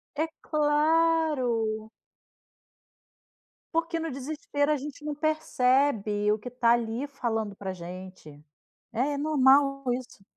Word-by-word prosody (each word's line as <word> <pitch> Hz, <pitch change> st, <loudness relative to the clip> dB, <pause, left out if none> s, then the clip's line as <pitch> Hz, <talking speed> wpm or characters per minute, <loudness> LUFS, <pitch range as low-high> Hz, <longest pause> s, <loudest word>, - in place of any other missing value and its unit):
É 315 Hz, +2 st, +1 dB, 0.2 s
claro. 295 Hz, -8 st, +1 dB, 1.8 s
Porque 330 Hz, 0 st, 0 dB
no 325 Hz, -1 st, -3 dB
desespero, 285 Hz, +2 st, -1 dB
a 300 Hz, -, +2 dB
gente 295 Hz, +1 st, -8 dB
não 300 Hz, -1 st, -2 dB
percebe, 260 Hz, -8 st, +1 dB
o 215 Hz, -, 0 dB
que 245 Hz, +4 st, -8 dB
tá 240 Hz, -1 st, +2 dB
ali, 235 Hz, +3 st, -1 dB
falando 225 Hz, -7 st, -3 dB
pra 190 Hz, -1 st, -5 dB
gente. 180 Hz, -4 st, -10 dB, 0.5 s
É 275 Hz, +5 st, 0 dB
normal 275 Hz, -2 st, +4 dB
isso. 245 Hz, -5 st, -7 dB
265 Hz, 110 wpm, -27 LUFS, 220-300 Hz, 1.8 s, normal